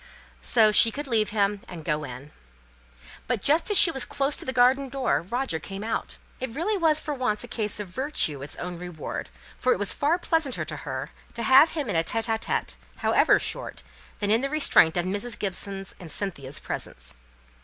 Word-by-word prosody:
So 220 -3 +4
she 225 +2 +8
could 290 +5 -6
leave 225 -5 +1
him, 205 -1 0
and 165 -4 -9
go 150 -1 -1
in. 135 +2 -9 1.0
But 245 -2 0
just 315 +7 +3
as 415 - +4
she 370 -4 +9
was 265 -4 +1
close 275 +1 0
to - - -3
the 260 - -2
garden 260 +2 +3
door, 255 - 0
Roger 235 -1 -3
came 195 +5 -7
out. 225 +1 -3 0.2
It 260 - -3
really 335 - -1
was 320 -5 +3
for 300 - -4
once 250 -6 -2
a - - -8
case 210 -3 -2
of 205 - -5
virtue 220 - -1
its 140 - -6
own 175 -1 -6
reward, 175 -3 -6 0.3
for 255 - +3
it - - -3
was 200 -1 +2
far 305 +4 +1
pleasanter 325 -6 -1
to - - -6
her - - -6 0.2
to 235 - -4
have 265 +7 +6
him 300 -5 -3
in 200 - -2
a 165 - +2
tÉte 225 +5 -2
ł - - -6
tÉte, - - -2 0.3
however - - +4
short, - - -4 0.3
than 205 0 -1
in 225 +2 +4
the 275 - -1
restraint 275 - +4
of 175 - 0
Mrs. 205 +5 -2
Gibson's 195 0 -3
and 170 -4 -9
Cynthia's 150 -8 -3
presence. - - -7
220 Hz, 205 wpm, -25 LUFS, 180-270 Hz, 1.0 s, she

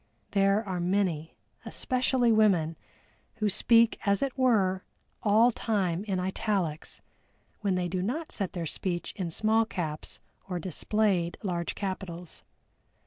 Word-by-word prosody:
There 200 +2 +3
are 185 -2 -2
many, 175 -3 0 0.3
especially 255 -2 +1
women, 190 -8 +3 0.6
who 215 -2 +1
speak, 230 +3 +4
as 200 +4 +2
it 275 -2 -2
were, 205 -8 +2 0.4
all 220 +3 +5
time 195 -6 0
in 195 -3 -1
italics, 185 -4 -2 0.6
when 200 -3 0
they 180 -1 0
do 180 +1 -2
not 285 - -2
set 195 -4 -2
their 175 -2 -3
speech 175 +2 -3
in 185 -4 -3
small 220 +6 +2
caps 160 -8 -5 0.3
or 180 - -1
displayed 185 +1 0
large 175 -3 -2
capitals. 185 -3 -4
195 Hz, 130 wpm, -29 LUFS, 175-220 Hz, 0.6 s, all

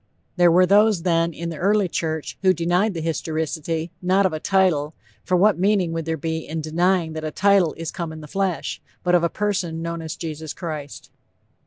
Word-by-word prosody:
There 175 -2 +5
were 180 +2 +5
those, 205 -1 +4
then, 170 -2 +2
in 170 +1 -5
the 165 - -7
early 200 +1 +2
church 160 -2 -3
who 185 -1 +4
denied 175 +5 +1
the 165 - -3
historicity, 160 +1 -2
not 190 +2 +3
of 185 - +1
a 155 - -3
title, 165 -6 +1 0.3
for 180 - +1
what 195 -1 +4
meaning 190 -3 +2
would 165 -1 -3
there 160 0 -2
be 160 +1 -2
in 160 0 -5
denying 165 +2 +1
that 155 0 -5
a 155 - -2
title 195 -1 +3
"is 165 -1 -4
come 170 -3 -5
in 155 0 -9
the 150 - -10
flesh," 190 +1 -2 0.2
but 180 - +1
of 175 -1 +4
a 170 - +2
person, 180 -6 -2
known 170 0 -4
as 160 0 -6
_Jesus 160 -2 -6
Christ. 155 -5 -7
170 Hz, 205 wpm, -22 LUFS, 160-185 Hz, 0.3 s, There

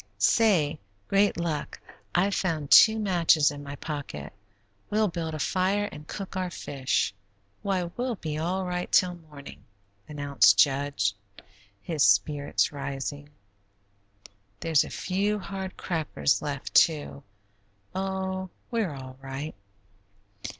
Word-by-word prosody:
Say, 170 -10 +3 0.3
great 200 -1 +3
luck, 165 -3 -3 0.4
I've 195 +3 +3
found 160 -7 -1
two 220 0 +8
matches 170 -7 +3
in 145 0 -8
my 140 0 -7
pocket. 135 - -6 0.6
We'll 215 0 +2
build 165 -2 -4
a - - -3
fire 195 +5 +1
and 150 0 -11
cook 195 -2 -6
our 185 -1 -1
fish. 135 - -1 0.5
Why, 195 -3 0
we'll 240 +8 -3
be 155 -5 -4
all 185 +4 -1
right 180 0 -3
'til 180 -1 +4 0.2
morning," 140 -2 -11 0.5
announced 145 -2 +4
Jud, 140 -4 +2 0.8
his 160 -4 -2
spirits 145 -1 +2
rising. 140 +1 -5 1.3
"There's 160 -3 +3
a - - -8
few 200 +3 -1
hard 190 -2 -6
crackers 150 - 0
left, 145 -2 -5
too. 150 -4 +3 0.7
Oh, 190 0 -3 0.2
we're 215 -10 -1
all 130 -1 -9
right." 135 +3 -5
165 Hz, 120 wpm, -27 LUFS, 145-190 Hz, 1.3 s, two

